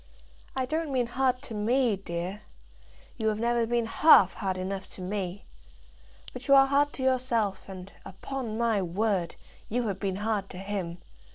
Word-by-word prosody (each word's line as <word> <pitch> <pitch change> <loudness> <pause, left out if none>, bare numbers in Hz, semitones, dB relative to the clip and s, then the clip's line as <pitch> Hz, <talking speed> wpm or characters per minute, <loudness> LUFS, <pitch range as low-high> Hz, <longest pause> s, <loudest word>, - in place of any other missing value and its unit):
I 260 -1 0
don't 310 +2 -2
mean 255 -2 +1
hard 255 +1 0
to 245 - -7
me, 230 +2 +2
dear. 185 +1 -5 0.8
You 220 -2 -1
have 215 -1 +1
never 235 0 +1
been 235 0 +1
half 225 - +6
hard 190 -3 -2
enough 190 +1 -4
to - - -9
me. 190 0 -4 0.9
But - - -7
you 275 - +7
are 270 0 +8
hard 285 +1 +2
to 260 - -5
yourself, 235 -7 0
and, 190 0 -9
upon 225 +3 -5
my 230 -3 +2
word, 185 -1 -1 0.3
you 240 +1 0
have 195 -1 -4
been 190 -1 -1
hard 210 -1 -1
to 180 - -9
him. 190 -3 -4
220 Hz, 170 wpm, -28 LUFS, 195-250 Hz, 0.9 s, are